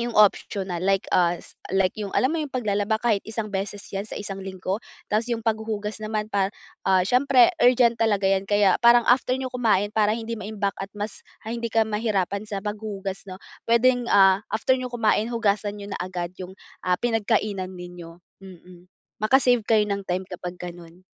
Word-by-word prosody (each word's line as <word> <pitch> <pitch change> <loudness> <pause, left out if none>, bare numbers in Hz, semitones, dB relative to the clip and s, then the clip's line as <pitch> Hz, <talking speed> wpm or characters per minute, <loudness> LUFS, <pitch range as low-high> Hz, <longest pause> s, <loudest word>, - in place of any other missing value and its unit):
'yong 240 0 -2
optional. 190 -3 +2
Like, 195 0 +1
ah, 175 -1 +3
s - - -17 0.2
like 190 -1 +2
yung 205 -2 -5
alam 265 +6 +2
mo 320 - -1
'yong 295 - -6
paglalaba 215 -3 0
kahit 220 -4 +1
isang 220 -2 -5
beses 195 +1 -3 0.2
yan 195 - -1
sa 210 - -7
isang 195 -1 -6
linggo. 190 +2 -4 0.2
Tapos 220 +3 -1
'yong 235 - 0
paghuhugas 220 -1 -2
naman 215 0 -2
pa 200 -2 0 0.3
ah, 185 -1 +3
syempre 250 +1 +4
urgent 245 -1 +5
talaga 210 -4 +1
'yan 190 0 +2
kaya 205 -1 +3
parang 235 0 +6
after 255 +1 +3
niyo 265 - -3
kumain, 210 -4 +1
para 210 -1 +3
hindi 230 +1 -3
maimbak 205 -1 -3
at 195 - -7
mas, 210 +1 -5 0.2
ah, 225 - -3
hindi 235 -1 -3
ka 225 -1 +2
mahirapan 210 -2 -1
sa 210 -2 -5
paghuhugas, 205 -2 -5
'no, 185 - -8 0.3
puwedeng, 245 +1 +3
ah, 195 0 +5
after 230 +4 +2
niyo 255 -1 -4
kumain, 225 -1 +1
hugasan 210 -3 0
niyo 200 - -8
na - - -4
agad 180 -1 -5
'yong, 190 +2 -10 0.2
ah, 180 -1 +1
pinagkainan 215 -5 0
ninyo, 175 -1 -10 0.2
mm. 180 -1 -14 0.3
Maka-save 245 0 +4
kayo 215 -1 +3
ng 200 -1 -2
time 185 +1 -1
kapag 180 -1 -7
gano'n. 175 0 -10
210 Hz, 185 wpm, -24 LUFS, 190-225 Hz, 0.3 s, parang